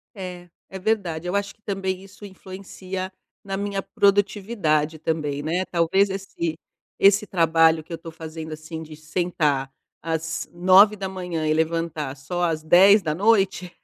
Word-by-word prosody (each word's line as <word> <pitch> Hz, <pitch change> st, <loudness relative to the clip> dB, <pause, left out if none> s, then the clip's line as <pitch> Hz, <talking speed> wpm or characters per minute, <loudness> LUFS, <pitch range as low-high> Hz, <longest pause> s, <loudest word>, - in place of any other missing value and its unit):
É. 180 Hz, -2 st, -8 dB, 0.2 s
É 190 Hz, -, -6 dB
verdade. 185 Hz, -5 st, -1 dB
Eu 180 Hz, -, -2 dB
acho 200 Hz, 0 st, -2 dB
que, -, -, -40 dB
também, 190 Hz, -1 st, -3 dB
isso 195 Hz, +1 st, -16 dB
influencia 190 Hz, -1 st, -7 dB, 0.3 s
na 195 Hz, -1 st, -4 dB
minha 200 Hz, -1 st, -2 dB
produtividade, 195 Hz, -7 st, +1 dB
também, 150 Hz, -3 st, -2 dB
né. 175 Hz, +5 st, -1 dB
Talvez, 185 Hz, +4 st, +2 dB
esse 190 Hz, -4 st, -4 dB, 0.5 s
esse 200 Hz, +1 st, +5 dB
trabalho 165 Hz, -3 st, +3 dB
que 165 Hz, +2 st, -10 dB
eu -, -, -3 dB
tô 165 Hz, 0 st, -10 dB
fazendo, 160 Hz, 0 st, -8 dB
assim, 160 Hz, +1 st, -7 dB
de 155 Hz, -1 st, -11 dB
sentar 155 Hz, -4 st, -1 dB, 0.3 s
às 160 Hz, 0 st, -3 dB
9h00, 185 Hz, -2 st, +3 dB
e 155 Hz, -, +3 dB
levantar 160 Hz, -3 st, -1 dB
só 175 Hz, +6 st, -4 dB
às 160 Hz, -2 st, 0 dB
22h00, 190 Hz, +2 st, +4 dB
175 Hz, 140 wpm, -23 LUFS, 160-195 Hz, 0.5 s, esse